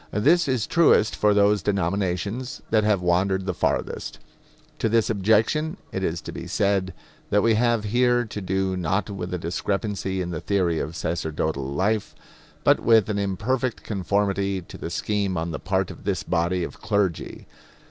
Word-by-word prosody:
This 155 - +3
is 130 -5 0
truest 165 -10 +4
for 105 - +3
those 105 0 +3
denominations 100 - -1
that 110 -1 +4
have 105 -4 +2
wandered 95 +2 +1
the 90 - -1
farthest. - - -2 0.6
To 115 - +1
this 115 0 +2
objection 110 - +2
it 95 - -3
is 85 -2 -1
to - - -7
be - - -7
said 100 -3 0 0.3
that 105 0 +3
we 115 - +4
have 115 0 +2
here 120 +3 +2
to 105 -1 -6
do 95 0 -1
not 95 +4 -1
with 95 -2 -5
a 90 - -1
discrepancy 95 +3 -2
in 90 -1 -3
the 80 - -4
theory 90 -5 +1
of 80 +4 -4
sacerdotal 80 -4 -2
life, 100 +7 0 0.5
but - - +5
with 110 -3 +4
an 105 -1 0
imperfect 110 +6 -1
conformity 100 -1 0
to - - -12
the - - -5
scheme 100 +1 -1
on 85 +1 -2
the - - -4
part 95 -1 -1
of - - -12
this 95 -2 -1
body 85 +1 0
of - - -7
clergy. 100 -5 -1
100 Hz, 170 wpm, -24 LUFS, 90-110 Hz, 0.6 s, but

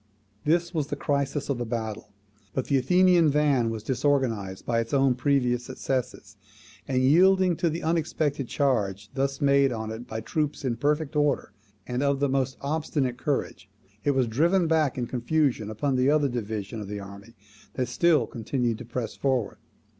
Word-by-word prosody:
This 170 +3 +1
was 155 -4 -1
the 145 - -3
crisis 140 0 -1
of 140 -4 -1
the - - -1
battle. 110 -2 -4 0.5
But 130 - -1
the 140 - +2
Athenian 180 +3 +4
van 140 -5 +2
was 110 -2 -5
disorganized 120 -7 -1
by 115 -1 +1
its 115 +4 -2
own 135 -1 +4
previous 125 -2 +1
successes; 125 -5 -4 0.5
and, 130 -1 +1
yielding 185 +5 +5
to 170 - +1
the 165 +2 -4
unexpected 155 -4 -1
charge 105 -8 -1
thus 135 0 -1
made 140 -1 +4
on 110 -2 -4
it 115 +2 -7
by 110 0 -4
troops 145 +6 -2
in 120 -3 -1
perfect 150 +3 0
order, 145 -7 +1 0.3
and 125 +1 -2
of 140 -1 +1
the 140 0 +1
most 135 -1 0
obstinate 140 -4 -1
courage, 100 -10 -3 0.3
it 145 -1 +1
was 130 -2 +3
driven 170 +11 +2
back 160 -5 +1
in 125 - -1
confusion 125 -2 0
upon 130 +6 -1
the 130 +2 +3
other 150 -1 +3
divisions 110 -3 -4
of 105 - -7
the 105 0 -5
army 100 +3 -11 0.4
that 130 -1 -1
still 165 -8 +3
continued 115 +1 -2
to 120 - -8
press 120 0 -4
forward. 130 -6 -1
130 Hz, 175 wpm, -26 LUFS, 115-145 Hz, 0.5 s, yielding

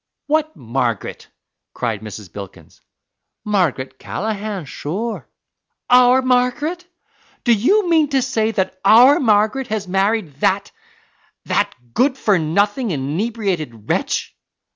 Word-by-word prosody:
"What 310 +1 0
Margaret?" 120 -2 -3 0.5
cried 115 -4 -2
Mrs. 105 -4 -9
Bilkins. 100 -2 -11 0.6
"Margaret 145 -11 -1
Callaghan, 210 -4 -4
sure." 200 +12 -5 0.6
"Our 250 +1 +6
Margaret? 255 +8 0 0.6
Do 240 - +4
you 360 - +2
mean 320 -3 +3
to 270 -2 +1
say 225 -4 0
that 190 -3 -2
OUR 245 +8 +7
Margaret 220 +2 +2
has 215 -4 -3
married 195 -5 0
that 195 +4 +1 0.7
that - - 0 0.2
good 265 +1 +2
for 205 -7 +2
nothing, 205 - 0
inebriated 160 - -3
wretch?" - - -1
210 Hz, 110 wpm, -19 LUFS, 155-250 Hz, 0.7 s, OUR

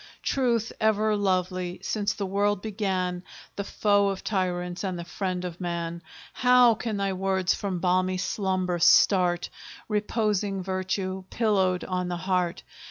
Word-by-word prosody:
Truth, 235 -4 0
ever 215 0 +2
lovely, 185 -2 -1
since 205 -1 0
the 205 -2 -4
world 205 +1 +1
began, 190 -4 -2 0.3
The 200 - -3
foe 200 0 +2
of 195 -1 -4
tyrants, 180 -3 -2
and 185 -2 -2
the 170 - -5
friend 185 0 -3
of 175 0 -7
man, 170 -1 -3 0.3
How 250 -1 +5
can 220 -1 -3
thy 195 -1 0
words 190 -1 +1
from 195 -3 -3
balmy 185 +1 +1
slumber 185 -1 -1
start 175 0 +4 0.4
Reposing 210 -2 0
Virtue, 185 0 -3
pillowed 190 -5 +1
on 180 -1 -2
the 175 -1 -3
heart! 180 -1 -1
190 Hz, 140 wpm, -26 LUFS, 180-205 Hz, 0.4 s, How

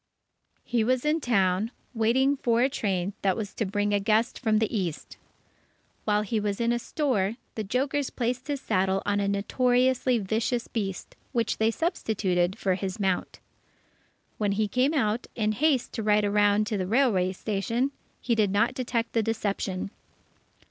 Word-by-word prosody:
He 235 -2 0
was 255 +3 +1
in 310 +2 +2
town, 200 -4 +2 0.2
waiting 255 +5 +2
for 240 -3 +2
a 265 - +3
train 195 -5 -1
that 190 -2 +1
was 205 -3 -4
to 220 - -2
bring 205 +1 0
a 205 - +3
guest 220 +3 +1
from 220 -4 +2
the 220 +1 0
East. 175 -7 -3 0.9
While 210 0 +2
he 215 +2 -1
was 205 -1 -2
in 235 0 +2
a 240 - +1
store, 230 - 0 0.2
the 220 - -3
jokers 265 +6 -1
placed 245 +2 -2
his 285 -2 -2
saddle 190 +1 +1
on 205 0 +1
a 200 - 0
notoriously 250 +5 +2
vicious 225 +3 -1
beast, 195 -4 -4 0.2
which 230 -3 0
they 220 0 +3
substituted 200 - 0
for 190 -4 +1
his 190 +1 -4
mount. 190 -2 -1 1.0
When 205 -2 +1
he 215 +1 +1
came 255 +8 +1
out, 225 -3 0
in 215 -2 +1
haste 275 +2 +1
to - - -3
ride 210 -1 +3
around 205 +1 +3
to 210 -1 -2
the 185 - -2
railway 210 -6 +2
station, 230 +7 -1 0.3
he 240 - 0
did 215 -3 +2
not 205 +5 +2
detect 240 -2 -2
the 230 - +3
deception. 200 -3 -2
220 Hz, 170 wpm, -27 LUFS, 200-245 Hz, 1.0 s, a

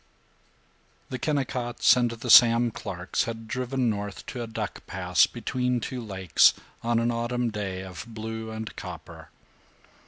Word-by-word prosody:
VII - - -37
The 130 - -3
Kennicotts 125 -5 +2
and 120 -1 +2
the 115 +1 -2
Sam 120 0 +7
Clarks 90 -3 -3
had 115 -1 -6
driven 130 +1 -1
north 100 -3 -3
to 125 - -6
a 115 - -4
duck 110 - -5
pass - - +3
between 125 -1 -1
two 125 +2 -5
lakes, 95 -6 +4 0.3
on 120 0 +1
an 115 +1 +1
autumn 120 0 -1
day 95 -3 -4
of 95 0 -8
blue 110 0 -6
and 110 0 -6
copper. - - -9
115 Hz, 150 wpm, -26 LUFS, 110-125 Hz, 0.3 s, Sam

